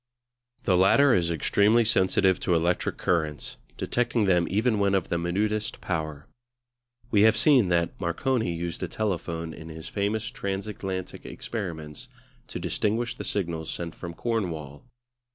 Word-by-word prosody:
The 95 - +3
latter 125 +9 +5
is 85 -3 +2
extremely 105 +8 +3
sensitive 95 -3 +3
to 90 - +1
electric 85 +2 0
currents, 75 -5 -1 0.2
detecting 120 -2 0
them 90 -3 +3
even 110 +1 +1
when 100 -1 +3
of 95 - 0
the 85 - 0
minutest 105 +5 -1
power. 80 -4 -3 0.9
We 105 - +4
have 110 0 +5
seen 120 -5 +5
that 85 -1 0
Marconi 110 +5 0
used 85 0 -4
a - - -1
telephone 85 -6 -3
in 80 +2 -10
his 80 0 -8
famous 110 +3 -1
transatlantic 95 -3 -4
experiments 80 -9 -6 0.4
to - - -6
distinguish 115 +3 -1
the - - -7
signals 85 -5 -2
sent 85 -1 -4
from 85 -2 -8
Cornwall. 85 - -3
95 Hz, 140 wpm, -26 LUFS, 85-110 Hz, 0.9 s, latter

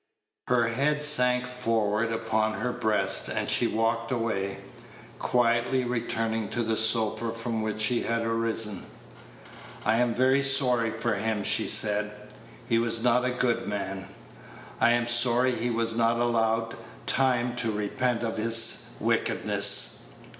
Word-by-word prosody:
Her 120 -2 +2
head 150 +5 0
sank 125 -4 +3
forward 115 -3 -1
upon 110 -1 -1
her 125 +3 -2
breast, 110 -1 -1
and - - -3
she - - +1
walked 115 +1 -1
away, 100 -5 -2 0.6
quietly 120 +1 +1
returning 115 -2 -2
to 120 - -2
the 110 0 -1
sofa 110 0 0
from 115 0 -4
which 110 0 -3
she 115 +2 +1
had 115 0 -2
arisen. 115 -3 -1 1.0
"I 110 - +2
am 120 -1 0
very 130 +2 +3
sorry 130 -4 +3
for 115 +1 -2
him," 105 0 -2
she - - +2
said; 105 -1 +2 0.6
"he 115 -2 +2
was 115 0 -1
not 125 0 +2
a - - +1
good 125 -1 -1
man. 95 -1 -5 0.7
I 120 - +4
am 120 0 0
sorry 120 +1 +3
he 120 +1 -2
was 115 -1 -1
not 115 0 +1
allowed 115 -1 0 0.3
time 125 -2 +1
to 120 -2 0
repent 115 +4 -2
of 115 -1 -3
his 115 +1 +2
wickedness." - - +1
115 Hz, 140 wpm, -26 LUFS, 110-120 Hz, 1.0 s, I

